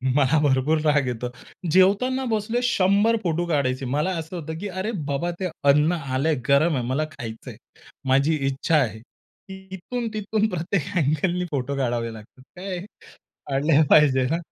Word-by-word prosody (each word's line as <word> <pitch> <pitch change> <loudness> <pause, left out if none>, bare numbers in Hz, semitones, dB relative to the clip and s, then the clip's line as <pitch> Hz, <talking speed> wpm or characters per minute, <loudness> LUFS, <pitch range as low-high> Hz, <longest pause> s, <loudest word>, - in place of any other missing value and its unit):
मला 145 +2 +3
भरपूर 145 +2 +2
राग 145 -3 +3
येतो. 125 0 -3 0.4
जेवताना 205 +9 +3
बसले, 220 +3 0
शंभर 205 0 +3
फोटो 170 0 0
काढायचे. 135 -3 0
मला 150 +9 0
असं 165 +3 -6
होतं 160 -1 -5
की, 205 - -4
"अरे 190 +5 -3 0.2
बाबा, 165 +5 -1
ते 185 - -1 0.2
अन्न 150 +4 +4
आलंय, 145 -1 -1
गरम 145 +3 +4
आहे, 125 - -1
मला 145 +4 0
खायचंय." 115 -6 -8 0.5
माझी 140 +4 +3
इच्छा 135 +4 0
आहे, 110 -6 0
की 190 - -16
इथून 235 +6 -4
तिथून 215 +1 0
प्रत्येक 175 -1 -1
अ‍ॅगलने 170 +4 +1
फोटो 140 0 -2
काढावे 120 -3 -1
लागतात. 110 +4 -14
काय 185 0 -5 0.5
काढले 145 +2 +1
पाहिजे 135 -4 +5
ना. 165 - +1
155 Hz, 155 wpm, -24 LUFS, 135-185 Hz, 0.5 s, पाहिजे